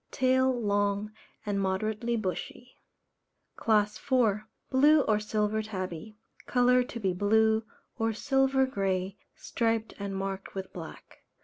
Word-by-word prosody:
Tail 260 0 +2
long 205 -1 0 0.3
and 200 -1 -1
moderately 215 +5 -1
bushy. 220 +4 -5 0.8
CLASS 210 -1 +1
IV. 220 -6 +1 0.3
Blue 295 +3 +6
or 215 -5 +1
Silver 210 0 0
Tabby. 195 -1 -6 0.3
Colour 250 0 +4
to 245 -1 -5
be 190 -4 0
blue, 220 +3 +3 0.4
or 225 0 +1
silver 270 +3 +2
grey, 195 -5 -2 0.2
striped 225 -1 -1
and 200 -1 -4
marked 195 0 -5
with 190 -1 -6
black. 165 -3 -10
215 Hz, 120 wpm, -29 LUFS, 200-245 Hz, 0.8 s, Blue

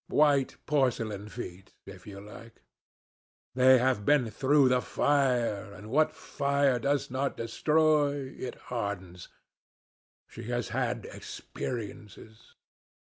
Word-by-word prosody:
White 145 -3 +3
porcelain 115 -8 0
feet, 95 -4 -9
if 95 0 -12
you 100 -1 -8
like. 110 +3 -13 0.9
They 130 0 +6
have 125 -4 +1
been 125 -3 +3
through 135 +3 +4
the 125 0 +3
fire, 125 -10 +1
and 105 +2 -11
what 155 +3 +3
fire 140 -2 0
does 140 +1 0
not 135 +2 -2
destroy, 145 +2 +1
it 125 - -6 0.2
hardens. 95 -6 -4 1.0
She - - -10
has 120 0 -2
had - - -2
experiences." 110 -2 -8
125 Hz, 110 wpm, -29 LUFS, 105-140 Hz, 1.0 s, They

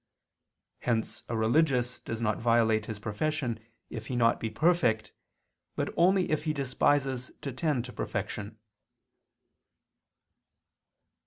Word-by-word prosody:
Hence 115 -2 -1
a 115 - -1
religious 125 +1 +2
does 115 - -5
not 110 -2 0
violate 110 -2 +3
his 110 - -4
profession 115 +3 -2 0.3
if 110 -2 -6
he 125 - -3
be - - 0
not 115 -1 +3
perfect, 155 -10 +2 0.6
but - - -2
only 185 +1 +3
if 155 0 0
he 155 - +1
despises 135 -1 +1
to 140 - -3
tend 130 -3 0
to 125 - -9
perfection. 105 0 -4
120 Hz, 115 wpm, -29 LUFS, 110-145 Hz, 0.6 s, violate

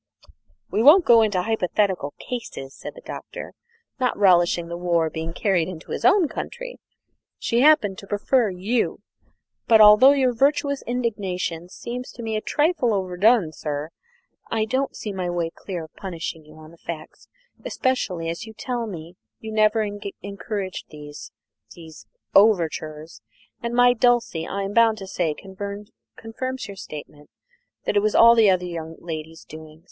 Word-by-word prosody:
"We 215 - +1
won't 315 +9 +7
go 230 -1 +7
into 205 -5 +1
hypothetical 190 -7 0
cases," 220 - -7
said - - -9
the - - -13
Doctor, - - -8 0.5
not 250 -1 0
relishing 175 -3 +3
the 170 - -5
war 170 -2 0
being 160 0 -4
carried 175 -2 +1
into 175 -3 -9
his - - -4
own 380 -6 +5
country; - - -7 0.6
"she 235 - 0
happened 250 -9 +4
to 200 - -12
prefer 215 +3 +1
you. 200 +6 -1 0.7
But, 225 -1 +6
although 215 +6 +8
your 260 -3 +2
virtuous 280 +2 +1
indignation 195 -8 -3
seems 245 +6 -7
to 235 - -9
me 220 -1 -2
a 215 - -1
trifle 295 -7 +1
overdone, 190 0 +2
sir, 150 -1 -4 0.6
I 220 -1 0
don't 260 +5 -1
see 210 - -5
my 185 -2 -3
way 170 -1 -2
clear 180 -4 -6
to - - -47
punishing 165 -4 -6
you 155 +1 -16
on 155 0 -13
the 170 - -17
facts, 160 -2 -9 0.4
especially 250 - -1
as 170 +8 -5
you 220 - -10
tell 240 -2 -3
me 170 -2 -9 0.2
you 220 - -7
never 215 0 +3 0.4
encouraged 200 -1 -5
these 150 -1 -10 0.4
these 160 -2 -13 0.3
overtures, 160 - +2 0.4
and 235 0 -3
my 245 0 +6
Dulcie, 235 -9 +1
I 200 0 -3
am 195 +1 -4
bound 230 -1 +4
to 195 - -7
say, 175 -5 -2
confirms 210 - -7
your 200 - -8
statement 150 -4 -10 0.6
that - - -1
it 205 - +4
was 215 0 0
all 235 0 +8
the 225 -3 +5
other 180 -1 +2
young 165 -2 -6
lady's 160 -1 -7
doing. 155 0 -12
200 Hz, 160 wpm, -23 LUFS, 170-235 Hz, 0.7 s, although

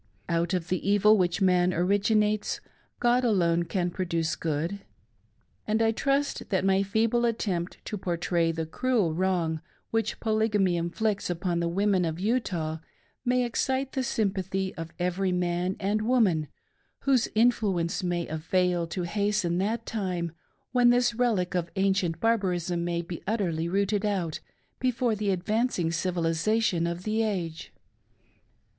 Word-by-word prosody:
Out 170 +2 0
of 175 -2 -3
the 185 +2 -1
evil 210 +1 +5
which 180 -1 +1
man 180 -1 +4
originates, 210 +3 +1 0.4
God 245 +1 +3
alone 175 -7 +2
can 175 0 -1
produce 170 -3 -1
good; 165 +5 -2 0.9
and 215 +1 +1
I 225 0 +3
trust 275 +5 -1
that 190 -2 +1
my 195 0 +3
feeble 220 +4 +1
attempt 195 -7 -1
to 210 - -4
portray 170 -1 0
the 165 0 -3
cruel 215 -1 0
wrong 170 -3 0 0.3
which 225 -2 -1
Polygamy 215 -4 +1
inflicts 195 +5 -1
upon 175 0 -1
the 170 - 0
Women 195 +1 +2
of 165 0 -2
Utah 185 -8 -1 0.4
may 250 0 +2
excite 265 +3 -1
the 265 - -1
sympathy 190 -5 -1
of 165 -2 -7
every 180 +1 0
man 180 +1 0
and 205 +2 0
woman 215 -10 +2 0.5
whose 260 -4 +3
influence 210 -7 +2
may 175 -2 -1
avail 175 +2 0
to 180 +2 -3
hasten 200 -1 0
that 225 +4 -1
time 180 -6 -2 0.4
when 245 -1 +5
this 245 0 +3
relic 225 -7 +1
of 175 -2 -1
ancient 190 -4 +1
barbarism 180 -5 0
may 170 0 -1
be 170 0 -7
utterly 170 -7 0
rooted 200 +2 +1
out 190 -7 -1 0.4
before 250 -2 +1
the 210 -1 -1
advancing 190 -1 0
civilisation 170 +2 +1
of 170 +1 -4
the 220 +2 0
age. 180 -7 -3
190 Hz, 140 wpm, -27 LUFS, 170-220 Hz, 0.9 s, evil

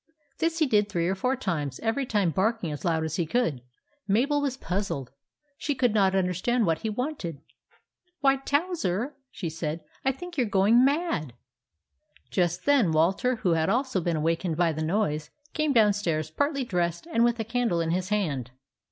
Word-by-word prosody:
This 330 0 0
he 320 - +3
did 210 -5 +2
three 170 -4 0
or 190 - +1
four 250 +7 0
times, 150 - -3
every 240 +4 -1
time 205 -7 +1
barking 195 -1 0
as 145 - -6
loud 165 -3 +1
as 160 0 -3
he 170 - +1
could. 165 - 0 0.5
Mabel 270 +9 +2
was 275 -3 -1
puzzled. 175 - -3 0.5
She 290 - -1
could 245 -4 +2
not 195 -3 +3
understand 190 +6 +1
what 165 -2 +1
he 220 - -3
wanted. 215 - -4 0.4
" 360 0 -47
Why, 275 -1 +4
Towser," 280 - -1 0.2
she 180 - -5
said, 160 0 -4
" - - -31
I 265 - +3
think 345 +3 -7
you 250 - +3
're - - -6
going 205 +5 +5
mad." 275 - 0 1.0
Just 175 -2 0
then 275 - +4
Walter, 185 +11 +2
who 205 -6 0
had 160 +1 +2
also 245 -3 +1
been 170 0 0
awakened 165 +1 0
by 170 -1 +3
the 155 0 -4
noise, 155 -3 0 0.2
came 305 -2 +1
downstairs 205 - +2
partly 285 - 0
dressed 175 - -1
and 315 -9 +1
with 240 0 +2
a - - 0
candle 230 -5 0
in 165 -1 0
his 185 +2 -1
hand. 155 - -1
200 Hz, 185 wpm, -27 LUFS, 165-255 Hz, 1.0 s, going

